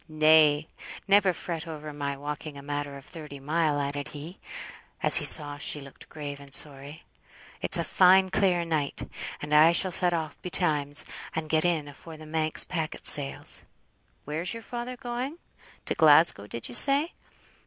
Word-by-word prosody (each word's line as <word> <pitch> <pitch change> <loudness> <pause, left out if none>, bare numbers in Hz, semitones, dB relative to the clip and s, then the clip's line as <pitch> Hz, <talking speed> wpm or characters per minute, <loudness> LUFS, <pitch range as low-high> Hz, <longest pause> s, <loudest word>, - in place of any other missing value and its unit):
"Nay, 155 -1 +3 0.4
never 200 -1 +4
fret 170 -1 -6
over 155 -2 -8
my 140 -1 -5
walking 145 +1 -7
a 140 - -11
matter 145 -1 -5
of 135 - -15
thirty 150 -3 -11
mile," 150 +1 -1
added 140 0 -4
he, 155 +5 -10 0.6
as - - +7
he - - 0
saw 145 -3 +1
she 150 - -3
looked 140 -1 -14
grave 145 -2 -8
and 140 -1 -14
sorry. 145 +3 -1 0.6
"It's - - +1
a - - -1
fine 190 0 +3
clear 180 -3 +1
night, 155 -4 -3 0.4
and 150 +1 -5
I 155 +3 +6
shall 185 +2 +2
set 180 0 +3
off 160 -3 -5
betimes, 150 -5 +2 0.3
and 155 -1 -5
get 155 +1 +1
in 165 -4 -1
afore 155 +3 -13
the 155 - -13
Manx 155 0 +1
packet 160 -3 -6
sails. 140 -2 +4 0.6
Where's 160 +7 -3
your 230 - -9
father 245 +2 -7
going? 255 +4 -6 0.5
To - - -2
Glasgow, 150 -9 +5
did 115 +2 -7
you 120 - -11
say? 285 - +4
155 Hz, 165 wpm, -26 LUFS, 145-175 Hz, 0.6 s, as